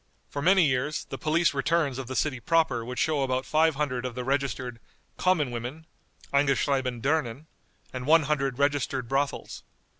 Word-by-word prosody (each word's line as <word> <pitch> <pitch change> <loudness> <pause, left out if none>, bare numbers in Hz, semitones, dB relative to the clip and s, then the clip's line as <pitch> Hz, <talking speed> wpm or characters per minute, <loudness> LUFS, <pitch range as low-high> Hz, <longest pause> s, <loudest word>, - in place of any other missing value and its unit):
For 140 - -3
many 185 +2 +5
years 140 +2 -1
the - - -5
police 160 +2 +2
returns 140 -1 0
of 130 - -6
the 130 - -5
city 130 -3 0
proper 155 -3 +1
would 125 +2 -6
show 150 +2 +1
about 130 -1 -1
five 160 0 +3
hundred 135 -4 -2
of 125 -2 -4
the 125 - -3
registered 130 -3 -2 0.4
"common 165 -8 +2
women" 120 +7 -6 0.5
(eingeschrieben 135 -3 +1
Dirnen), 145 -2 0 0.5
and 130 0 -5
one 160 +1 +6
hundred 135 -3 -1
registered 140 -3 0
brothels. 135 +3 -2
140 Hz, 160 wpm, -27 LUFS, 125-155 Hz, 0.5 s, one